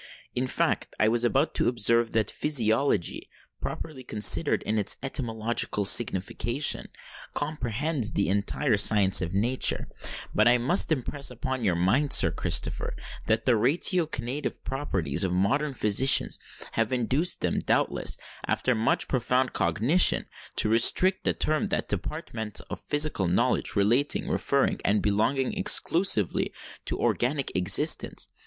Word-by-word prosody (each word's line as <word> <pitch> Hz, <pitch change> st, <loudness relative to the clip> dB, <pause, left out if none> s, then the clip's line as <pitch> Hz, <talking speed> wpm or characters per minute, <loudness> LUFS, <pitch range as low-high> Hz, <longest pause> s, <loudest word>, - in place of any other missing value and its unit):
"In 125 Hz, +1 st, -2 dB
fact, -, -, -1 dB
I 110 Hz, -, +3 dB
was 115 Hz, +2 st, +1 dB
about 135 Hz, +6 st, +1 dB
to -, -, 0 dB
observe 115 Hz, 0 st, +2 dB
that 110 Hz, -1 st, 0 dB
physiology, 115 Hz, -, 0 dB, 0.3 s
properly 145 Hz, -5 st, -6 dB
considered 120 Hz, +7 st, +2 dB
in 110 Hz, 0 st, -1 dB
its 105 Hz, -, +1 dB
etymological 115 Hz, -5 st, -1 dB
signification, 120 Hz, +6 st, +1 dB, 0.5 s
comprehends 145 Hz, -3 st, -2 dB
the 100 Hz, -, 0 dB
entire 105 Hz, +5 st, 0 dB
science 100 Hz, -2 st, +3 dB
of 90 Hz, +1 st, -4 dB
Nature; 120 Hz, +6 st, 0 dB, 0.5 s
but 110 Hz, +2 st, +3 dB
I 120 Hz, +1 st, +5 dB
must 135 Hz, +10 st, +2 dB
impress 140 Hz, 0 st, -3 dB
upon 130 Hz, 0 st, -5 dB
your 95 Hz, -5 st, +1 dB
mind, 110 Hz, +12 st, +1 dB
Sir -, -, +5 dB
Christopher, -, -, -1 dB, 0.3 s
that 110 Hz, 0 st, 0 dB
the 130 Hz, -, +3 dB
ratiocinative 145 Hz, -, -1 dB
propensities 95 Hz, -, -2 dB
of 90 Hz, -2 st, -1 dB
modern 135 Hz, +10 st, 0 dB
physicians 110 Hz, +5 st, +3 dB, 0.3 s
have 115 Hz, +1 st, -1 dB
induced 130 Hz, +8 st, 0 dB
them, -, -, -1 dB
doubtless -, -, 0 dB, 0.3 s
after 130 Hz, -, 0 dB
much 110 Hz, -1 st, 0 dB
profound 125 Hz, 0 st, 0 dB
cogitation, 115 Hz, -, +2 dB, 0.3 s
to -, -, +1 dB
restrict 150 Hz, -, +3 dB
the -, -, +2 dB
term 155 Hz, 0 st, -1 dB
to -, -, -5 dB
that -, -, -4 dB
department 110 Hz, -2 st, -5 dB
of -, -, -5 dB
physical 145 Hz, -, 0 dB
knowledge 85 Hz, -, 0 dB
relating, 120 Hz, +8 st, +1 dB
referring, -, -, 0 dB
and 105 Hz, +1 st, +1 dB
belonging 110 Hz, -, 0 dB
exclusively 190 Hz, -, +2 dB, 0.3 s
to -, -, -3 dB
organic 135 Hz, +3 st, -1 dB
existence. 90 Hz, -1 st, +2 dB
120 Hz, 135 wpm, -26 LUFS, 105-140 Hz, 0.5 s, I